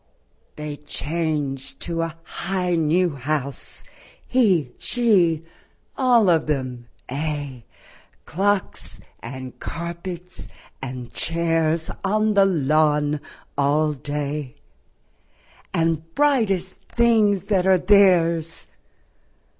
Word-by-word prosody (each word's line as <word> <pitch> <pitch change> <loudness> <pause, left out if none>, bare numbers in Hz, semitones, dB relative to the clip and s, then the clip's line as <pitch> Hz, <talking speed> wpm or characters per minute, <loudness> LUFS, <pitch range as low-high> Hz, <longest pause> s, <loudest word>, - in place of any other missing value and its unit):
They 150 -1 -6
change 150 -2 -3
to 165 -1 -3
a 165 -1 -4
high 180 0 -2
new 170 +2 +2
house, 140 0 -4 0.4
He, 190 - +2
she, 185 -10 +3 0.5
all 245 -5 +4
of 165 -3 +3
themŌĆöaye, 135 +1 -4 0.6
Clocks 200 +2 -1 0.2
and 130 +1 -8
carpets 170 +1 -6 0.3
and 125 -2 -7
chairs 165 -1 0
On 215 +2 +2
the 200 -1 +5
lawn 150 -3 +2 0.4
all 150 +2 +2
day, 145 -1 -4 1.2
And 165 0 -1
brightest 220 -11 +2 0.2
things 220 -5 +4
that 190 -3 +1
are 190 -1 +6
theirs 175 -4 +3
165 Hz, 85 wpm, -23 LUFS, 145-190 Hz, 1.2 s, are